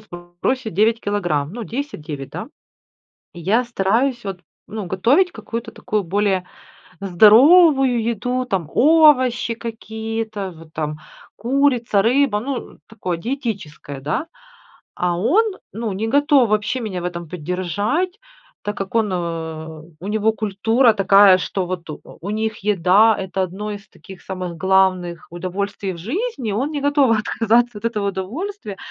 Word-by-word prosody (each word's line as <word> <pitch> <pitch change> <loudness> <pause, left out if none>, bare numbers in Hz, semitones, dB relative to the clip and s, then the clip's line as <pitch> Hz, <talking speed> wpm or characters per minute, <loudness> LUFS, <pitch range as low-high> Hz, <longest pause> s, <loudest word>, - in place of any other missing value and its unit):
сбросить 175 +5 -4
9 220 +4 +3
килограмм, 175 -8 -1
ну 235 +1 -6
10-9, 160 - -6
да? - - -6 0.9
И 175 - -9
я 220 +8 +2
стараюсь 240 +3 0
вот, 195 -3 -5 0.3
ну 215 -3 -6
готовить 240 - +2
какую-то 230 0 -6
такую 210 -1 -2
более 190 0 0 0.5
здоровую 250 - +6
еду, 240 +3 -1
там 185 -10 -3
овощи 265 -6 +4
какие-то 220 -2 -5
в 165 -2 -14
там, 155 -1 -4 0.4
курица, 245 -3 +2
рыба, 245 0 +2
ну, 265 +2 -5
такое 190 -6 -4
диетическое, 200 - -5
да? 150 - -2 0.7
А 175 -1 -1
он, 295 - +3 0.3
ну, 220 -1 -3
не 215 +4 -2
готов 285 -1 +4
вообще 215 +4 0
меня 200 -6 -4
в - - -7
этом 170 -2 -5
поддержать, 185 - -2 0.4
так 205 0 -4
как 195 +1 -5
он, 225 -2 +2
э, 160 -3 -4 0.2
у 185 - -8
него 220 +1 +1
культура 220 +3 +2
такая, 195 -2 +6
что 185 +2 -2
вот 175 -2 -5
у 150 - -7
у 195 - -9
них 220 0 -2
еда, 205 +2 +4
это 190 0 -2
одно 190 +4 -4
из 205 0 -8
таких 190 -1 -14
самых 185 -3 -6
главных 185 -2 +1
удовольствий 190 +3 -4
в - - -9
жизни. 265 - -3
Он 255 +9 -1
не 290 -2 -3
готов 285 -5 +3
отказаться 230 +1 +1
от 225 - -3
этого 210 -3 -1
удовольствия, 210 - -5
210 Hz, 140 wpm, -20 LUFS, 185-240 Hz, 0.9 s, здоровую